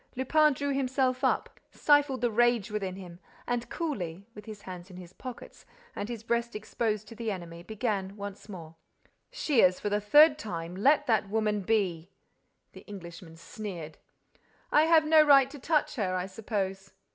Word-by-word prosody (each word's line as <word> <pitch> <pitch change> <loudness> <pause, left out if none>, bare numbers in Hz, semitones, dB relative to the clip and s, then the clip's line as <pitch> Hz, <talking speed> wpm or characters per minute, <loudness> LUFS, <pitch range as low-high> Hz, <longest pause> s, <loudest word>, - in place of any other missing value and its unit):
Lupin 300 +4 +3
drew 285 +1 -2
himself 260 -1 0
up, - - 0
stifled 290 -4 +2
the 240 -1 +1
rage 235 -2 +2
within 195 -3 -3
him 180 -3 -11 0.3
and, 245 0 -2
coolly, 195 - -4
with 210 -2 -11
his 210 -2 -10
hands 180 0 -9
in 180 - -11
his 180 0 -11
pockets 255 +3 -10 0.3
and 205 - -4
his 230 -2 -6
breast 235 0 -1
exposed 215 0 -2
to - - -10
the 230 0 -4
enemy, 170 -4 -6
began 205 -1 -3
once 200 +1 -8
more: 165 -5 -9 0.6
"Shears, 250 - +2
for 205 - -2
the 205 0 +1
third 295 +8 +6
time, 170 - -5
let 275 +10 +3
that 220 -4 +1
woman 210 -1 0
be—" 185 -5 -1 0.6
The - - -13
Englishman 170 -4 -10
sneered: 175 -5 -8 0.7
"I 300 +1 +5
have 320 -1 +5
no 310 0 +6
right 275 -3 +6
to 290 - -10
touch 300 0 0
her, 185 -5 -1
I 180 0 -1
suppose? 195 -1 -4
210 Hz, 170 wpm, -29 LUFS, 190-255 Hz, 0.7 s, third